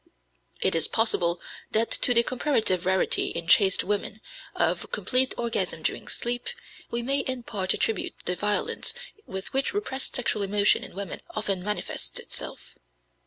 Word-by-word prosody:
It - - +3
is 165 -1 +3
possible 175 -6 +2 0.3
that 225 +1 +2
to 245 - +4
the 235 - +7
comparative 230 - 0
rarity 190 0 +3
in 170 - -3
chaste 190 +3 +5
women 205 +1 -2 0.4
of - - 0
complete 260 0 +3
orgasm 235 -1 -1
during - - -2
sleep, 245 - -2 0.4
we 235 0 -2
may 275 +3 +1
in 260 -2 -3
part 195 -5 -1
attribute 220 -4 -1
the 180 - +2
violence 210 - 0 0.3
with 190 +7 -5
which 270 +8 0
repressed 270 -11 -2
sexual 235 -4 0
emotion 200 +1 +2
in - - -8
women 200 0 -5
often 200 -4 -2
manifests 210 +1 -2
itself. - - -4
215 Hz, 150 wpm, -26 LUFS, 190-250 Hz, 0.4 s, the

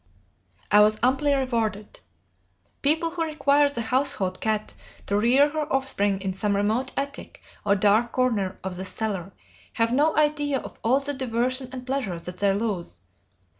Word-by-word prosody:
"I 210 - +7
was 215 +1 +5
amply 270 +3 +2
rewarded. 225 -6 -2 0.8
People 320 +3 +1
who 335 -1 -2
require 290 -2 +2
the 235 -5 -3
household 220 -6 0
cat 215 -1 -1 0.3
to 200 - 0
rear 250 +7 +4
her 305 0 -3
offspring 205 -8 +1
in 190 -1 -2
some 200 +2 -1
remote 220 +6 0
attic 280 0 -5 0.2
or 200 -1 +3
dark 210 +4 +3
corner 225 -7 0
of 185 -1 -4
the 190 - -5
cellar 195 -3 -3 0.4
have 230 0 +1
no 300 +4 +2
idea 295 -2 +2
of - - -9
all 255 +4 +3
the 285 +1 -2
diversion 255 0 -1
and 255 -1 -7
pleasure 255 -9 -2
that 180 +2 -8
they 200 0 +2
lose. 195 - -3
235 Hz, 160 wpm, -25 LUFS, 205-275 Hz, 0.8 s, I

